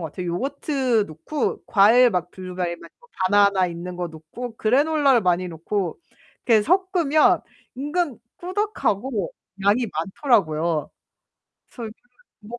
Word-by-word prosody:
같아요. 180 +4 -6
요거트 260 - 0
넣고 160 - -3
과일 230 +5 +6
막 180 -3 -2
블루베리나 180 -2 -5
뭐 485 - -22 0.2
바나나 200 -2 +4
있는 175 +1 -6
거 175 -1 -3
넣고 170 +10 -9
그래놀라를 275 +2 +3
많이 180 0 +1
넣고 175 - -3 0.5
이렇게 220 -3 +5
섞으면 350 - +3 0.4
은근 295 -2 -1 0.2
꾸덕하고 270 - -2 0.3
양이 220 +5 +3
많더라고요. 165 - 0 0.8
그래서 230 -3 -7 0.5
뭐 230 +3 -9
210 Hz, 270 characters per minute, -23 LUFS, 180-275 Hz, 0.8 s, 과일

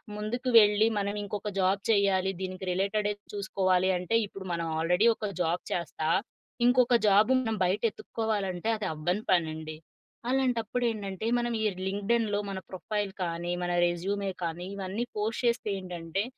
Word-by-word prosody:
ముందుకు 240 +5 -2
వెళ్ళి 210 +1 +5
మనం 200 0 -1
ఇంకొక 210 +1 -4
జాబ్ 190 +1 +2
చేయ్యాలి. 195 -2 +3
దీనికి 185 0 -5
రిలేటెడే 205 +3 0 0.2
చూసుకోవాలి 190 -2 +1
అంటే 180 +5 -1
ఇప్పుడు 195 -1 -9
మనం 170 0 -2
ఆల్‌రెడీ 180 +6 +2
ఒక 215 - -4
జాబ్ 170 +1 0
చేస్తా, 160 -2 -2 0.6
ఇంకొక 245 0 +4
జాబ్ 205 +3 +5
మనం 225 -3 -1
బయట 190 +4 0
ఎత్తుక్కోవాలంటే 205 -5 -3
అది 210 - -4
అవ్వని 175 +6 -1
పనండి. 160 -3 0 0.5
అలాంటప్పుడు 245 -2 0
ఏంటంటే 200 -1 -5
మనం 240 0 -1
ఈ - - +1 0.2
లింక్డ్‌ఇన్‌లో 205 +1 0
మన 190 - -4
ప్రొఫైల్ 205 +2 -3
కానీ, 170 0 -3
మన 175 - -1 0.2
రెజ్యూమే 195 +3 -2
కానీ, 170 +1 -3
ఇవన్నీ 195 +4 -3
పోస్ట్ 220 +3 -1
చేస్తే 235 -2 +1
ఏంటంటే 180 0 -3
200 Hz, 145 wpm, -29 LUFS, 180-215 Hz, 0.6 s, వెళ్ళి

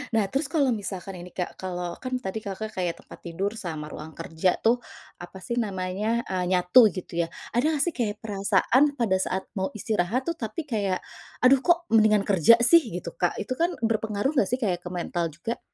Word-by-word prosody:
Nah, 215 -3 +3
terus 270 +1 0
kalau 280 -7 +2
misalkan 195 -2 -5
ini, 180 - -9
Kak, 180 -1 -4
kalau 180 -2 -4
kan 255 0 -2
tadi, 220 -2 -5
Kakak, 215 +1 -5
kayak 175 -2 -2
tempat - - -12
tidur 185 +4 -3
sama 165 -8 -5
ruang 155 +1 -9
kerja 165 +2 0
tuh 240 +2 +2 0.4
apa 175 +2 -9
sih 235 +6 -4
namanya 205 +3 -2
eee, 185 -1 -2
nyatu 185 +6 +6
gitu 175 -2 -4
ya. 165 - -1 0.3
Ada 245 +6 +2
nggak 280 - +2
sih 345 - -1
kayak 215 -4 -2
perasaan 210 +5 +2
pada 215 -7 +2
saat 190 0 -2
mau 190 -2 -1
istirahat 215 +4 -1
tuh 335 - -1
tapi 235 +5 -4
kayak, 205 -8 -1 0.5
"Aduh 260 +1 +6
kok 345 +2 +2
mendingan 215 -2 +5
kerja 200 +3 +6
sih," 335 +5 +8 0.2
gitu, 170 -1 -7
Kak, 175 +1 -1
itu 210 - -3
kan 335 +6 +1 0.2
berpengaruh 220 +3 0
nggak 240 -10 +2
sih 250 - +1
kayak 190 -8 -1
ke 175 - -7
mental 175 -1 -2
juga? 170 +10 -5
205 Hz, 200 wpm, -26 LUFS, 180-235 Hz, 0.5 s, sih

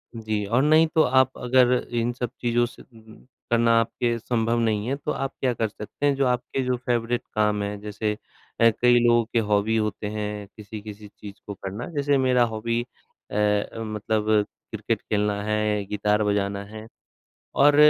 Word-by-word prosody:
जी, 110 -2 -2
और 120 +6 +2
नहीं 155 +2 +5
तो 160 - +6
आप 130 0 +3
अगर 125 0 +4 0.2
इन 120 0 0
सब 125 -1 -3
चीज़ों 120 0 +2
से 120 - -11 0.7
करना 115 0 +4
आपके 120 +1 -1
संभव 115 0 0
नहीं 110 -2 0
है 135 - 0
तो 145 +2 -4
आप 135 0 -2
क्या 130 -2 +2
कर 115 -1 -1
सकते 105 +6 -6
हैं, 140 -1 +3
जो 135 0 +1
आपके 125 +1 -1
जो 125 0 +1
फ़ेवरेट 120 0 0
काम 105 -1 +2
हैं, 100 0 -4
जैसे 105 0 -3 0.4
अ, 115 - +8
कई 120 0 +6
लोगों 120 0 +5
के 115 - +4
हॉबी 105 +2 +2
होते 105 -1 -2
हैं 105 -1 -4
किसी-किसी 105 0 -9
चीज़ 100 0 -11
को 100 - -4
करना, 100 +4 -6
जैसे 145 0 +2
मेरा 130 -2 +3
हॉबी 115 +2 -1
अ, 120 -3 -14 0.4
मतलब 110 -1 0 0.3
क्रिकेट - - -2
खेलना 105 -1 -1
है, 105 -1 0
गिटार 105 +1 +1
बजाना 100 -1 0
है 110 +1 -10 0.7
और 145 +1 +6
110 Hz, 170 wpm, -24 LUFS, 105-125 Hz, 0.7 s, अ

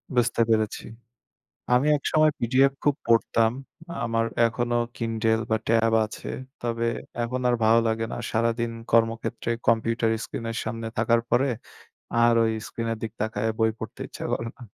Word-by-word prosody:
বুঝতে 120 -1 +2
পেরেছি। 110 -1 +1 0.9
আমি 125 +4 +3
একসময় 155 +2 +3
পিডিএফ 130 +3 +3
খুব 145 - +4
পড়তাম। 115 -1 +3 0.5
আমার 115 -1 +1 0.2
এখনো 120 +1 -1 0.2
কিন্ডল 115 -1 0
বা 110 - +4
ট্যাব 115 0 +3
আছে। 110 - -9 0.3
তবে 115 0 -1 0.4
এখন 125 +2 -2
আর 120 - +3
ভালো 115 +1 +6
লাগে 110 0 0
না। - - -3 0.2
সারাদিন 115 +1 +1 0.2
কর্মক্ষেত্রে 115 0 +1 0.2
কম্পিউটার 115 0 +2
স্ক্রিন 115 - -6
এর 115 - -3
সামনে 115 -1 -4
থাকার 115 +1 +3
পরে, 135 +3 +3 0.8
আর 120 - +5
ওই 110 - +2 0.2
স্ক্রিন 115 0 -4
এর 115 - -2
দিকে 115 0 -5
তাকাইয়া 110 0 -1
বই 110 0 +3
পড়তে - - -7
ইচ্ছা - - -7
করে 115 - -2
না। 125 - -11
115 Hz, 155 wpm, -25 LUFS, 115-120 Hz, 0.9 s, ভালো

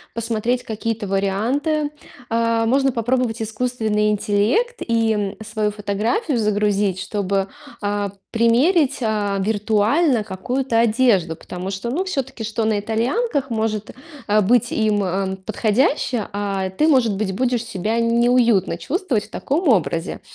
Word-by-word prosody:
посмотреть 230 +2 -1
какие-то 220 0 -3
варианты. 240 - 0 0.4
Э, 230 0 +1
можно 270 +3 +2
попробовать 240 -1 0
искусственный 220 -2 0
интеллект- 210 - +1
и 220 -4 0
свою 215 -1 -1
фотографию 215 - -1
загрузить, 205 -3 +1
чтобы, 195 -1 -1 0.3
а, 205 -1 -1 0.2
примерить, 255 +7 +3
а, 210 -3 0
виртуально 220 - +2
какую-то 230 +5 -1
одежду. 215 -8 +3
Потому 180 +3 -7
что, 195 +4 -4
ну, 340 +9 0
все-таки 270 -9 -3
что 220 +1 -2
на 215 -2 +1
итальянках 270 - -1
может, 220 -1 -2 0.4
э, 210 +1 +4
быть 235 +4 +2
им, 215 -2 +1
э, 190 +1 -1
подходящее, 225 +1 +1
а 200 -2 -2
ты, 190 +12 +1
может 245 -9 +3
быть, 195 -1 -2
будешь 245 +1 0
себя 220 +1 -2
неуютно 235 -5 +3
чувствовать 275 - -1
в - - -19
таком 310 +4 -1
образе. 175 - 0
220 Hz, 125 wpm, -21 LUFS, 205-250 Hz, 0.4 s, э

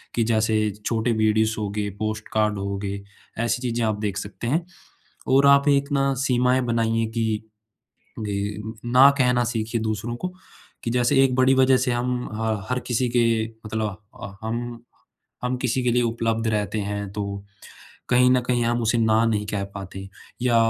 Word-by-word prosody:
कि 115 - +2
जैसे 110 -1 +2 0.3
छोटे 115 +1 0
वीडियोज़ 110 0 +2
होगए, 105 0 -2
पोस्ट 110 0 -3
कार्ड 105 -1 +1
होगए, 100 0 -4 0.4
ऐसी 120 +1 0
चीज़ें 120 -2 -1
आप 105 -1 -1
देख 100 -2 -2
सकते 100 +3 -6
हैं। 165 +6 0 0.6
और 135 +1 +5
आप 140 +1 +5
एक 140 +1 +2
ना 135 -1 +2
सीमाएँ 125 0 +3
बनाइए 115 -1 +1
कि, 110 -2 0 0.8
ग 105 +1 -3
ना 130 +3 +7
कहना 125 -1 +3
सीखिए 115 0 -2
दूसरों 110 +2 -2
को, 180 +8 -5 0.5
कि 115 - -2
जैसे 125 +3 +3
एक 130 -1 +2
बड़ी 130 +1 +4
वजह 130 0 +5
से 125 0 0
हम 125 +1 -1
ह 110 -1 -1
हर 125 - 0
किसी 125 0 0
के 115 -2 +2 0.2
मतलब 110 -3 -2 0.2
अ, 100 0 -7
हम 120 +1 -4 0.6
हम 125 0 -1
किसी 125 0 -1
के 125 - +2
लिए 125 +1 +3
उपलब्ध 115 -1 -1
रहते 105 0 -1
हैं, 100 -1 -4
तो 100 -1 -4 0.7
कहीं 125 0 +5
न 130 - +4
कहीं 120 -1 +2
हम 120 0 +1
उसे 115 +1 +1
ना 110 0 +3
नहीं 105 -2 0
कह 100 -2 -2
पाते 95 -1 -7 0.4
या 120 -2 +2
115 Hz, 170 wpm, -24 LUFS, 110-125 Hz, 0.8 s, ना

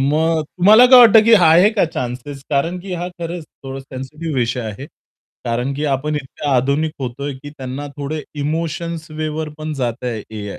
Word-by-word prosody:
मग 155 +3 +1
तुम्हाला 205 +9 +5
काय 255 0 +8
वाटतं, 225 -2 +8
की 230 - +4
आहे 175 +2 +6
का 210 -5 +2
चान्सेस? 135 -2 -5
कारण 165 +6 0
की 190 0 -7
हा 180 - -3
खरंच 170 -2 -6 0.2
थोडा 135 0 -6
सेन्सिटिव्ह 135 +4 -7
विषय 120 0 0
आहे. 110 +4 -6 0.6
कारण 125 +3 -1
की 150 +2 -3
आपण 145 +2 -1
इतक्या 145 +1 -5
आधुनिक 140 +5 0
होतो 130 +2 -5
आहे, 145 -2 -3
की 145 +1 -10
त्यांना 135 0 -6
थोडे 150 +2 -4 0.2
इमोशन्स 165 +2 -3
वेवर 155 0 -3
पण 155 0 -4
जातं 120 0 -2
आहे 115 -3 -3
AI. 105 -2 -6
150 Hz, 180 wpm, -19 LUFS, 135-165 Hz, 0.6 s, काय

